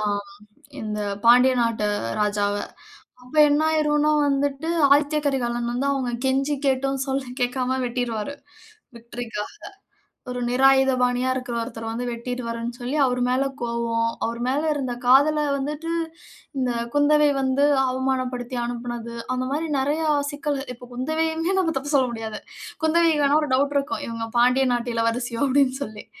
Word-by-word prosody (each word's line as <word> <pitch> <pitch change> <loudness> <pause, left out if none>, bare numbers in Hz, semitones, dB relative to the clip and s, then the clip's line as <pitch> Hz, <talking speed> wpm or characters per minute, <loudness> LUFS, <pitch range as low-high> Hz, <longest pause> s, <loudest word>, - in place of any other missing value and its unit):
ஆ - - -2 0.8
இந்த 210 -1 -3 0.3
பாண்டிய 250 +2 +6
நாட்டு 225 -3 0 0.3
ராஜாவ. 205 -1 +1 0.7
அப்போ 250 +5 -5
என்ன 290 +1 +2
ஆயிருன்னா 300 -1 +2 0.2
வந்துட்டு 280 +3 -1 0.2
ஆதித்ய 295 +1 +3
கரிகாலன் 240 -3 -1
வந்து 260 +3 -1
அவுங்க 260 -3 -2
கெஞ்சி 275 +2 +1
கேட்டும், 270 0 0
சொல்ல 270 0 -1 0.2
கேட்காம 255 +1 0
வெட்டிடுவாரு. 240 0 -3 0.6
விக்டரிக்காக 235 -2 -6 0.8
ஒரு 250 0 -3
நிராயுதபாணியா 255 -1 +3
இருக்கற 250 -2 -4
ஒருத்தர 230 -1 -6
வந்து 235 +2 -3
வெட்டி 235 +1 -5
டுவார்ன்னு 230 0 -4
சொல்லி 250 +4 -3
அவரு 250 -1 +1
மேல 255 +2 +2 0.2
கோபம், 235 -1 0 0.2
அவர் 230 +1 -3
மேல 270 +3 +1
இருந்த 260 -4 -3
காதல 290 +4 +5
வந்துட்டு 300 +4 -4 0.7
இந்த 255 -2 0 0.2
குந்தவை 295 +1 +4
வந்து 265 +1 +1 0.3
அவமானப்படுத்தி 255 -1 -2
அனுப்புனது. 240 -1 -5 0.2
அந்த 255 0 -1
மாதிரி 310 +3 -1
நிறைய 290 +4 0 0.3
சிக்கல்கள். 290 -2 -3
இப்ப 245 +1 -13
குந்தவையுமே 320 +7 -1
நம்ம 330 -3 +1
தப்பு 285 +3 -4
சொல்ல 260 -2 +4
முடியாது 220 -2 -5 0.4
குந்தவைக்கு 320 -2 +3
ஆனா 290 +2 +4
ஒரு 300 - -3
டவுட் 280 +2 +1
இருக்கும். 280 +1 -2
இவுங்க 230 -1 -4
பாண்டிய 250 +2 +4
நாட்டு 240 0 -2
இளவரசியோ 230 +1 -1
அப்பிடின்னு 265 -1 +2
சொல்லி, 210 -4 -9
255 Hz, 140 wpm, -23 LUFS, 240-285 Hz, 0.8 s, பாண்டிய